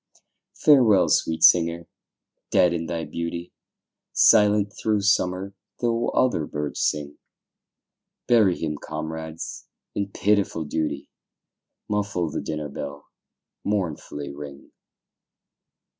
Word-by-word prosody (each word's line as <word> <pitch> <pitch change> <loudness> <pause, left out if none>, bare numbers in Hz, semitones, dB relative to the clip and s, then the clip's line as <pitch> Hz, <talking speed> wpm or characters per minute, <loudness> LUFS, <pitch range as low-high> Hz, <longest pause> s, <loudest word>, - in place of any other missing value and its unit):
Farewell, 125 -10 +5
sweet 80 0 +1
singer! 85 0 +5 0.6
dead 90 -1 +4
in 85 -1 -3
thy 85 -1 -3
beauty, 85 +1 -5 0.6
Silent 105 -1 +5
through 105 -2 0
summer, 95 -1 +1 0.3
though 120 -1 0
other 120 -12 +1
birds 75 -1 -4
sing; 75 -1 -1 1.1
Bury 110 -7 +4
him, 75 -2 -3
comrades, 80 +1 -6 0.3
in 100 -1 -2
pitiful 100 -6 +1
duty, 80 +1 -3 0.8
Muffle 100 -6 -1
the - - -3
dinner 75 -1 -4
bell, 70 +1 -8 0.5
mournfully 80 -7 -3
ring. 70 -1 -10
85 Hz, 100 wpm, -24 LUFS, 75-105 Hz, 1.1 s, Farewell